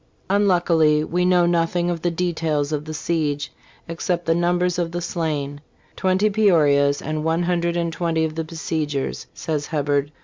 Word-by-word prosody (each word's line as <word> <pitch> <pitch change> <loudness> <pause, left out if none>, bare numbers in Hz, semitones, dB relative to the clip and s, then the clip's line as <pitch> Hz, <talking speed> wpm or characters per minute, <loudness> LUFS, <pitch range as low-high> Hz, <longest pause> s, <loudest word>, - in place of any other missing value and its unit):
'.'Unluckily 170 -6 +3
we 180 +3 0
know 180 -1 +4
nothing 175 +1 +1
of 170 -2 -4
the 175 - +1
details 160 -4 -1
of 150 -1 -2
the 155 - -6
siege, 150 -3 -1 0.4
except 170 +1 -2
the 165 - +3
number 175 +1 +1
of 175 -2 -1
the 175 - -3
slain: 150 -5 -3 0.3
twenty 190 +2 +2
Pe 215 +1 +2
orias 145 -5 +3
and 155 +1 -2
one 165 +2 +1
hundred 170 -1 0
and 170 -1 -1
twenty 165 -2 0
of 155 - -4
the 160 +1 -3
besiegers," 155 -3 -3
says 150 -3 -3
Hebberd. 145 -2 0
165 Hz, 170 wpm, -22 LUFS, 150-175 Hz, 0.4 s, know